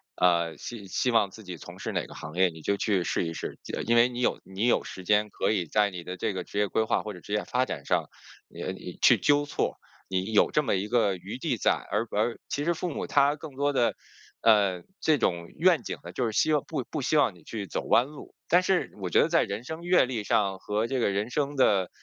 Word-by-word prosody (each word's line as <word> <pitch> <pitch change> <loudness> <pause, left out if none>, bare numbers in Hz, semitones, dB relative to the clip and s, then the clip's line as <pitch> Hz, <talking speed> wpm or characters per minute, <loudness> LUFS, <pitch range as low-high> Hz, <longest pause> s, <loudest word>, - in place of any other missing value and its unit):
呃， 85 -2 +2
希 110 -5 -8
希 125 +6 0
望 110 -4 +3
自 110 +3 -13
己 90 -3 -7
从 - - -11
事 - - -4
哪 - - -1
个 - - -12
行 80 - -8
业， 95 +1 +4
你 80 -1 -12
就 100 - 0
去 100 -3 +1
试 85 - -1
一 80 - -4
试。 - - -6
记 - - -7
得 - - -2
因 115 - +2
为 120 +1 +6
你 120 -1 -6
有 - - +1
你 95 +4 -3
有 120 - +3
时 95 - -8
间， 105 +3 +2
可 - - -1
以 95 -5 0
在 105 +6 +2
你 90 -2 -7
的 90 - -5
这 - - -1
个 95 -1 -4
职 - - -8
业 105 0 +3
规 110 - +1
划 110 - 0
或 105 - -5
者 90 - -10
职 100 - -8
业 105 - +1
发 125 +1 0
展 - - -6
上， - - +1 0.4
你 - - -9
你 - - -9
去 - - +7
纠 145 0 +3
错， 145 - -2 0.3
你 95 +2 -2
有 105 - +4
这 150 - +2
么 - - 0
一 95 +2 -2
个 105 -5 +2
余 95 +7 -7
地 130 -4 -1
在。 - - +3 0.2
而 105 +4 0
而 115 +3 0
其 145 - -2
实 170 - +2
父 175 +2 -3
母 - - -4
他 140 +1 +3
更 150 -2 -10
多 145 +1 +1
的， 120 -3 +2 0.5
呃， 100 -5 +4 0.2
这 155 -2 +3
种 85 -8 -1
愿 170 -5 +4
景 - - -5
呢， - - -8
就 125 - -1
是 115 - -1
希 155 +8 +3
望 150 - +2
不 150 -5 -3
不 155 - -3
希 150 +4 +1
望 115 -10 +3
你 85 - -19
去 105 +1 -6
走 - - -3
弯 120 - +4
路。 145 +1 -12 0.2
但 180 +2 +5
是 185 -1 +1
我 90 - -2
觉 - - +5
得 - - +3
在 - - +4
人 100 +3 -4
生 160 +4 -6
阅 175 -4 +4
历 120 -4 -3
上 100 -2 +1
和 105 +4 -1
这 130 0 -1
个 115 - +2
人 100 +3 -1
生 145 +2 -1
的， 100 -8 +3
110 Hz, 290 characters per minute, -27 LUFS, 95-135 Hz, 0.5 s, 去